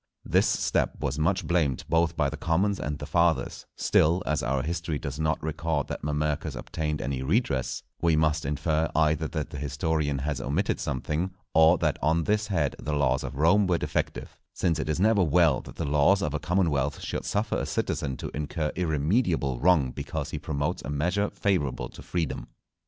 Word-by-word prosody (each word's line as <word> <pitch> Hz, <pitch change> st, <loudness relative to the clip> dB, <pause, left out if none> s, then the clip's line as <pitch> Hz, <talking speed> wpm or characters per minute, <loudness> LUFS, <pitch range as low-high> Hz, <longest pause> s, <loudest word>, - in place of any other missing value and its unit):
This -, -, +3 dB
step -, -, 0 dB
was 70 Hz, +3 st, -2 dB
much 85 Hz, +5 st, +1 dB
blamed 80 Hz, -7 st, +1 dB
both 85 Hz, 0 st, +1 dB
by 75 Hz, -3 st, +2 dB
the 75 Hz, -, -4 dB
commons 90 Hz, +6 st, +1 dB
and 75 Hz, 0 st, -3 dB
the -, -, -6 dB
Fathers; 85 Hz, -1 st, +1 dB
still, 85 Hz, +4 st, +3 dB
as 75 Hz, 0 st, 0 dB
our 70 Hz, -2 st, 0 dB
History 85 Hz, 0 st, -2 dB
does 70 Hz, +1 st, -5 dB
not 80 Hz, 0 st, +1 dB
record 80 Hz, -1 st, -1 dB
that -, -, -4 dB
Mamercus 75 Hz, 0 st, -1 dB
obtained 75 Hz, +5 st, -3 dB
any 65 Hz, -1 st, -2 dB
redress, 70 Hz, -, 0 dB, 0.2 s
we 85 Hz, -2 st, +3 dB
must 80 Hz, 0 st, +2 dB
infer 75 Hz, +3 st, 0 dB
either 80 Hz, 0 st, +2 dB
that 75 Hz, -3 st, -4 dB
the 70 Hz, -, -6 dB
Historian 75 Hz, +1 st, -1 dB
has 70 Hz, +2 st, -2 dB
omitted 80 Hz, +9 st, 0 dB
something, 75 Hz, +4 st, -2 dB, 0.2 s
or 80 Hz, +2 st, +6 dB
that -, -, 0 dB
on 80 Hz, +2 st, +2 dB
this 105 Hz, +4 st, +1 dB
head 85 Hz, -8 st, 0 dB
the 75 Hz, -, -3 dB
laws 65 Hz, -2 st, +1 dB
of 65 Hz, +1 st, -5 dB
Rome 90 Hz, +7 st, +4 dB
were 90 Hz, -2 st, +2 dB
defective; -, -, -3 dB, 0.2 s
since 85 Hz, -3 st, +1 dB
it 75 Hz, -, -2 dB
is 75 Hz, +1 st, 0 dB
never 105 Hz, +1 st, +4 dB
well 80 Hz, -3 st, +3 dB
that -, -, -12 dB
the -, -, -3 dB
laws 75 Hz, +8 st, +3 dB
of 75 Hz, -, -1 dB
a 80 Hz, -, -1 dB
commonwealth 75 Hz, -5 st, 0 dB
should -, -, -4 dB
suffer 105 Hz, +1 st, -1 dB
a -, -, -2 dB
citizen 65 Hz, -2 st, -2 dB
to -, -, -6 dB
incur 75 Hz, +1 st, -2 dB
irremediable 80 Hz, -, +1 dB
wrong 80 Hz, -6 st, +3 dB
because -, -, -5 dB
he -, -, -3 dB
promotes 70 Hz, -1 st, -2 dB
a -, -, -7 dB
measure 90 Hz, +8 st, 0 dB
favourable 90 Hz, -10 st, -1 dB
to -, -, -12 dB
freedom. 85 Hz, -5 st, -3 dB
75 Hz, 190 wpm, -27 LUFS, 70-85 Hz, 0.2 s, or